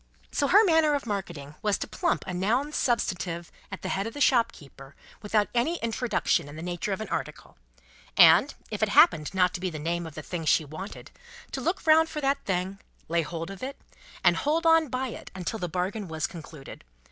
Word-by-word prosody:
So 285 - +1
her 405 +8 +7
manner 320 -5 +4
of 280 - -3
marketing 170 -9 -5
was 210 -2 +1
to - - -5
plump 345 -1 -1
a 185 - -5
noun 230 +11 0
substantive 180 - -1 0.2
at 200 - -7
the 185 - -3
head 195 +3 -1
of 225 - -8
a - - -5
shopkeeper 150 - 0 0.3
without 210 0 +1
any 245 +8 +1
introduction 230 - 0
in 145 - -10
the 160 - -7
nature 175 +3 -3
of 195 - -2
an 220 - -5
article, - - -5 0.6
and, - - +7 0.2
if - - -4
it - - +2
happened 155 -2 +5
not 180 -1 +3
to - - -4
be 185 0 -2
the 160 - -6
name 170 +2 -2
of 160 - -11
the 155 - -7
thing 170 -1 -5
she 155 +2 +3
wanted, 155 +8 -9 0.4
to - - -4
look 355 +2 -2
round 320 0 +5
for 305 - -4
that 280 0 0
thing, 190 +1 -2 0.3
lay 170 0 +2
hold 165 +2 -5
of 195 - -10
it, 270 +2 -6 0.4
and - - +5
hold 320 +3 0
on 325 -1 +5
by 255 0 -2
it - - -9
until 190 +4 -4
the 180 - -3
bargain 185 +5 -3
was 160 -3 -2
concluded. 155 -2 -9
195 Hz, 210 wpm, -27 LUFS, 170-265 Hz, 0.6 s, her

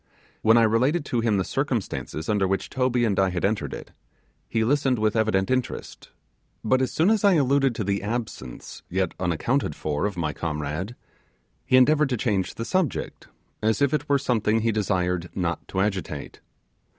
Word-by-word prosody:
When 110 +1 +5
I 115 - +6
related 130 +9 +2
to 120 - -1
him 115 -3 +2
the 95 - +1
circumstances 115 - -3
under 105 -3 +2
which 95 +1 -2
Toby 125 -2 +1
and 100 -4 +1
I 95 -1 +3
had 90 0 -1
entered 105 +1 -1
it, - - -8 0.6
he 115 - +1
listened 135 +1 +2
with 110 0 +1
evident 110 -2 +1
interest; 130 -1 -3 0.5
but 130 +4 +2
as 130 - 0
soon 170 +7 +3
as 220 -2 +1
I 200 -1 +6
alluded 135 -3 +2
to 110 - -2
the 100 0 -1
absence, 105 - -5
yet 95 -1 -1
unaccounted 90 - 0
for, 75 +5 -1
of 100 -3 -6
my 75 -3 -1
comrade, 80 +7 -4 0.7
he 130 - +5
endeavoured 150 +3 +4
to 125 - 0
change 100 -5 -1
the 115 - -4
subject, 185 -3 -2 0.3
as 110 +1 +1
if 140 -1 +2
it 150 -1 -1
were 140 - +4
something 115 -5 +1
he 115 +1 +2
desired 90 -4 -1
not 85 -2 -2
to 95 - -3
agitate. 95 -8 -3
110 Hz, 180 wpm, -25 LUFS, 95-130 Hz, 0.7 s, I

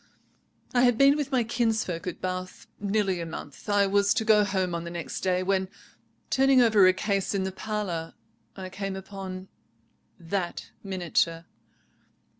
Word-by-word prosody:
"I 245 - +4
had 245 -2 +4
been 275 +2 +6
with 295 -2 -3
my 255 -3 +2
kinsfolk 220 -7 -1
at 180 - -4
Bath 185 0 -5
nearly 200 -3 0
a - - -3
month. 150 +2 -9
I 205 -1 +4
was 200 +1 +3
to 225 -3 0
go 215 -2 +5
home 190 -3 -1
on 170 0 -3
the 170 - -6
next 170 -1 -5
day, 185 -1 +1
when, 190 0 0 0.6
turning 270 0 +5
over 220 -6 +6
a - - +7
case 200 +1 -1
in 195 - 0
the 190 - -2
parlour, 190 -5 -4 0.4
I 190 -1 -6
came 195 0 -4
upon 190 -1 -7 0.7
that 175 +1 -4
miniature. 175 -3 0
195 Hz, 160 wpm, -27 LUFS, 185-215 Hz, 0.7 s, a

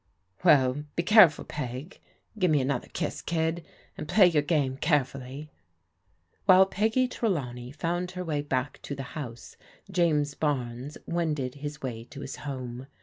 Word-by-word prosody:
"Well, 145 -4 +4
be 170 - 0
careful. 185 -5 +6
Peg. 135 - -6 0.4
Give 180 -2 +3
me 150 -2 +4
another 130 -1 -1
Idss, 155 - -3
Idd, 165 0 -1 0.3
and - - -6
play 200 +4 +6
your 165 -4 +4
game 145 -4 0
carefully." 140 -1 -1 0.9
While 190 -1 +8
Peggy 220 +6 +1
Trelawney 130 - -2
found 175 +4 -2
her 180 - -3
way 150 -3 -1
back 135 -2 -2
to 140 - -5
the 135 - -5
house, 120 -7 -7 0.3
James 155 -5 +2
Barnes 135 -2 -2
wended 155 -7 -1
his 145 +1 -7
way 115 -3 -4
to 140 +3 -10
his 135 -1 -6
home. 130 -2 -6
145 Hz, 145 wpm, -28 LUFS, 130-170 Hz, 0.9 s, While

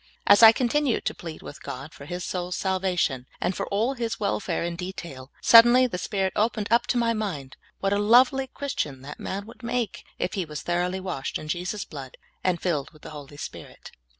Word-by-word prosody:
As 205 - +7
I 225 -1 +11
continued 255 +2 0
to - - 0
plead 165 -2 -9
with - - -10
God 135 +5 -7
for 140 - -11
his 175 +4 -5
soul's 180 -1 -3
sal 190 -1 0
vation, 175 -9 0
and 185 - -1
for - - -3
all 220 +7 0
his 235 -3 -3
welfare 195 -4 -1
in 170 0 -3
detail, 170 -7 -7
suddenly 240 +2 +8
the 205 -8 -3
Spirit 190 -2 -1
opened 215 -1 0 0.2
to 250 - +1
my 230 -1 +2
mind 180 -12 -4 0.3
what 195 0 +1
a 205 - +1
lovely 255 +5 +5
Christian 155 - -4
that 145 +2 -9
man 200 +1 -4
would 230 +3 -14
make 235 -1 -2
if 180 - -2
he 190 - -1
was 150 -2 -7
thoroughly 180 +2 0
washed 180 -8 -3
in 155 - -9
Jesus' 180 +6 -3
blood, 135 -4 -9 0.3
and 180 -2 +1
filled 155 -6 -1
with 155 -2 -21
the - - -9
Holy 145 -1 -10
Spirit. - - -9
185 Hz, 205 wpm, -26 LUFS, 155-225 Hz, 0.3 s, I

